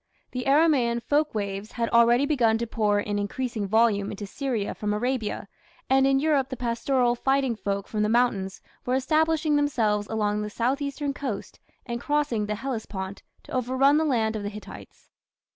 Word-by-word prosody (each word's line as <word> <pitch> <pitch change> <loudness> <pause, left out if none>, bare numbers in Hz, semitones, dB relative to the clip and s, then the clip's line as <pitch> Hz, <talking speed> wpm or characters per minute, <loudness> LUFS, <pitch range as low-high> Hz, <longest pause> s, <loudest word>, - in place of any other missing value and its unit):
The 250 -1 -4
Aramaean 270 -6 +3
folk 295 -2 +1
waves 200 0 -4
had 235 -1 -1
already 235 +3 +5
begun 235 -7 +2
to 235 - -2
pour 210 -3 +1
in 205 0 -2
increasing 220 +1 -3
volume 215 -1 +2
into 205 0 -6
Syria 235 -1 -3
from 210 0 -2
Arabia, 235 -2 -2 0.4
and 270 0 +5
in 270 0 +3
Europe 285 -3 +1
the 260 - -5
pastoral 245 +1 +1
fighting 270 0 +1
folk 200 -2 -3
from 215 - -2
the 210 - +2
mountains 220 -5 +1 0.2
were 250 - 0
establishing 310 +3 +2
themselves 220 -8 +1
along 210 -1 0
the 210 - -3
south 250 +6 -1
eastern 280 0 -2
coast 255 -7 -5 0.3
and 235 -1 -4
crossing 290 -8 0
the 210 - -1
Hellespont 205 -6 -5 0.2
to - - -15
overrun 260 +3 +3
the 315 - +2
land 225 -7 +1
of 215 - -3
the 205 - -3
Hittites. 210 0 -12
235 Hz, 175 wpm, -26 LUFS, 210-270 Hz, 0.4 s, already